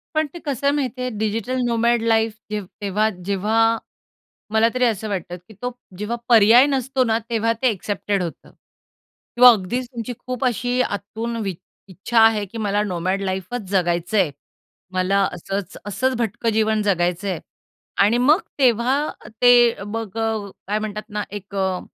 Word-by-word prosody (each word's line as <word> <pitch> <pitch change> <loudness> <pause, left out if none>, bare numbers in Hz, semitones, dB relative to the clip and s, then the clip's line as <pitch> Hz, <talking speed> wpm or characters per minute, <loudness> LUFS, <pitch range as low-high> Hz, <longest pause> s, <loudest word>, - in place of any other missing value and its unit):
पण 310 0 +2
ते 345 - -8
कसं 280 -2 -3
आहे 285 - +4
माहिती 260 -3 -2
आहे? 250 - -1
डिजिटल 225 +4 -1
नोमॅड 235 0 +2
लाईफ 225 -1 +2 0.2
जे 210 -1 -1 0.2
तेव्हा 205 +2 +1 0.2
जेव्हा 220 +4 +2 0.8
मला 220 +1 +5
तरी 255 0 +2
असं 220 -2 -1
वाटतं, 180 -2 -4
की 180 +5 -18
तो 250 - -2 0.3
जेव्हा 210 +3 -3
पर्याय 230 +3 +7
नसतो 265 -1 0
ना? 225 -2 +1
तेव्हा 230 0 +1
ते 260 - +4
एक्सेप्टेड 200 -2 -2
होतं 170 - -8 0.8
किंवा 250 +1 +9
अगदीच 235 +4 -1
तुमची 235 +1 -4
खूप 255 0 -2
अशी 245 +1 0
आतून 225 +2 -3
वि 190 -3 -3 0.3
इच्छा 195 +5 0
आहे 220 -2 +5
की 200 +4 -10
मला 205 -1 0
नोमॅड 185 0 -2
लाईफच 190 +5 -3
जगायचं 175 +1 +1
आहे. 175 -7 +3 0.6
मला 185 +2 +1
असंच, 195 +2 -5
असंच 255 +6 0
भटकं 230 0 -1
जीवन 220 0 +2
जगायचं 180 -1 0
आहे 185 -4 -2 0.6
आणि 225 +4 +3
मग 295 +8 +4 0.2
तेव्हा 250 +1 +3 0.4
ते 245 -1 +7
अ, 200 - -9
मग 220 0 -5
अ, 220 -3 -1 0.2
काय 210 +1 0
म्हणतात 215 0 -4
ना 210 -1 -3
एक 200 -1 -8
अ 190 -1 0
220 Hz, 165 wpm, -21 LUFS, 200-240 Hz, 0.8 s, किंवा